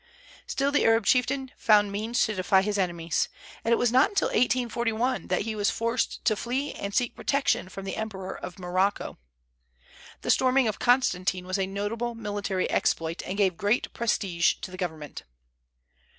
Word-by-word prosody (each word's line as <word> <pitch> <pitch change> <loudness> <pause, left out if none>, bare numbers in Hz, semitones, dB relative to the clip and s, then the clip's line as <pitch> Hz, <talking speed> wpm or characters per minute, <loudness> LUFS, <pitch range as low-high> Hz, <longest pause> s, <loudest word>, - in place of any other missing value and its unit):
Still, 275 +1 0
the 290 - +2
Arab 225 -1 +3
chieftain 265 +2 +1
found 210 -2 +4
means 220 +4 0
to 215 - -2
defy 190 0 +3
his 205 0 -1
enemies; 170 -3 -1 0.3
and 230 - 0
it 235 - +5
was 245 -2 +2
not 260 +11 +4
till - - +2
1841 240 0 0
that - - 0
he 220 +1 -3
was 205 -1 +1
forced 230 +1 -2
to 215 - +3
flee 255 +6 -2
and 200 0 -5
seek 245 -2 +1
protection 275 -9 0
from 195 +1 -8
the 195 - -4
Emperor 195 -4 -5
of 185 - -8
Morocco. 185 - -1 1.0
The - - +1
storming 260 -1 +3
of 215 - -2
Constantine 185 -8 +2
was 185 +2 -2
a 190 - 0
notable 220 +5 -3
military 205 -3 -2
exploit, 165 0 0
and 190 - -4
gave 190 -4 +2
great 205 +4 0
prestige 195 -7 +1
to - - -6
the - - -7
government. 160 -5 -5
210 Hz, 170 wpm, -27 LUFS, 190-240 Hz, 1.0 s, it